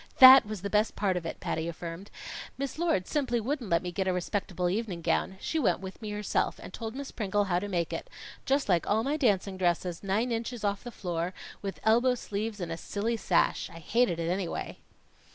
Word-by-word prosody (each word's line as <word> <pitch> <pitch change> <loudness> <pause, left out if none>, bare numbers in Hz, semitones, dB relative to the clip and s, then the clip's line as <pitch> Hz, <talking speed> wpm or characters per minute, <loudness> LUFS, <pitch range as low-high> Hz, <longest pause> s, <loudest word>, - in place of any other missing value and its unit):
"That 260 -4 +11
was 210 -3 -5
the 200 - -2
best 210 +1 +2
part 195 -3 +1
of 170 -2 -2
it!" - - -6
Patty 160 +1 -2
affirmed. 170 +3 -6 0.5
"Miss 275 +3 -4
Lord 325 - +1
simply 255 -3 0
wouldn't 250 -1 -2
let 170 +1 +2
me 180 - -3
get 190 +2 -1
a 185 - +2
respectable 180 0 -1
evening 185 -3 -2
gown. 170 +3 0
She 320 - -1
went 195 - +2
with 190 +2 -8
me 215 - -5
herself, 210 0 0
and - - -10
told 225 0 -5
Miss 280 0 -6
Pringle 205 -2 0
how 180 -3 +1
to 205 - -4
make 175 -4 -1
it - - -5 0.3
just 275 +1 +1
like 175 -4 +2
all 220 +2 +3
my 280 +4 0
dancing 200 -9 +1
dresses, 175 -1 0
nine 210 +5 0
inches 230 0 -3
off 200 -1 0
the 245 - -6
floor, 175 -4 -3 0.3
with 195 -1 -5
elbow 240 +3 +4
sleeves 215 -1 -4
and 175 -2 -4
a 165 - -3
silly 215 +6 -2
sash. 190 -5 +1
I 165 - -11
hated 200 +3 +1
it 170 0 -1
anyway." 185 -2 -3
200 Hz, 215 wpm, -29 LUFS, 180-230 Hz, 0.5 s, That